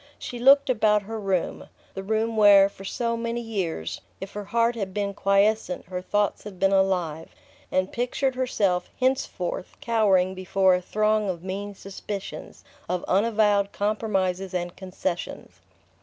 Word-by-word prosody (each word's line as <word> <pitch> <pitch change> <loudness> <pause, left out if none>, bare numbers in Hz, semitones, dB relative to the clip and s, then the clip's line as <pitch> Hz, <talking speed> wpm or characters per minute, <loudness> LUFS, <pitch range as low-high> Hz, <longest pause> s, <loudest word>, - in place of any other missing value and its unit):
She 245 - -7
looked 275 +3 +6
about 215 -4 +3
her 220 +2 -5
room, 195 -4 -2 0.2
the 195 - -5
room 220 +3 -1
where, 200 -2 +7
for 195 - -13
so 230 +4 -2
many 235 +1 -3
years, 190 - -3 0.2
if 195 - -7
her 205 0 -5
heart 230 +3 +2
had 195 -4 -4
been 200 -1 -1
quiescent 200 -1 +1
her 180 0 -5
thoughts 205 +2 0
had 205 -3 -9
been 195 0 +3
alive, 180 -5 0 0.4
and 185 0 0
pictured 250 +2 -1
herself 200 -8 0
henceforth 255 -9 -1
cowering 195 -5 +2
before 185 0 +2
a 180 - +1
throng 215 +2 +1
of 175 -2 -4
mean 200 +2 -5
suspicions, 195 +1 -7 0.3
of 180 -1 -2
unavowed 205 0 +2
compromises 195 -3 -1
and 175 -1 -3
concessions. 185 -2 -5
200 Hz, 145 wpm, -25 LUFS, 185-220 Hz, 0.4 s, where